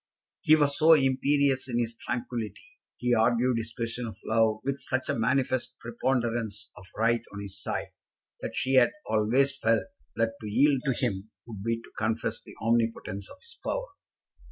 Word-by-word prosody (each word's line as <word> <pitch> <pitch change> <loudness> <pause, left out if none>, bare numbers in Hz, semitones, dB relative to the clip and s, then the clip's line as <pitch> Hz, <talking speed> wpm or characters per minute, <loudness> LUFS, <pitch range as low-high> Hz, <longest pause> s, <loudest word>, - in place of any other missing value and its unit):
He 155 - +6
was 145 -2 +2
so 160 +1 +8
imperious 135 -1 +2
in 120 - -1
his 115 -1 -1
tranquillity, 120 -2 -4 0.4
he 125 0 +1
argued 120 +1 +3
his 110 0 -4
question 115 +1 -3
of 110 - -8
love 110 -1 +3
with 140 0 -2
such 130 0 -2
a - - +2
manifest 125 +1 0
preponderance 115 - -2
of 90 - -13
right 115 +1 +2
on 100 - -7
his 100 -2 -7
side, - - -3 0.5
that - - -5
she 130 - 0
had 130 -2 +6 0.2
always 125 +6 +2
felt 115 -1 +3 0.3
that 115 0 +1
to 105 - -6
yield 135 +5 +3
to 135 - +2
him 100 -2 -2 0.2
would 110 -5 -8
be 115 +2 -1
to - - -15
confess 110 +1 -1
the - - -13
omnipotence 115 -4 0
of - - -12
his 470 - -14
power. - - -2
120 Hz, 175 wpm, -28 LUFS, 110-130 Hz, 0.5 s, so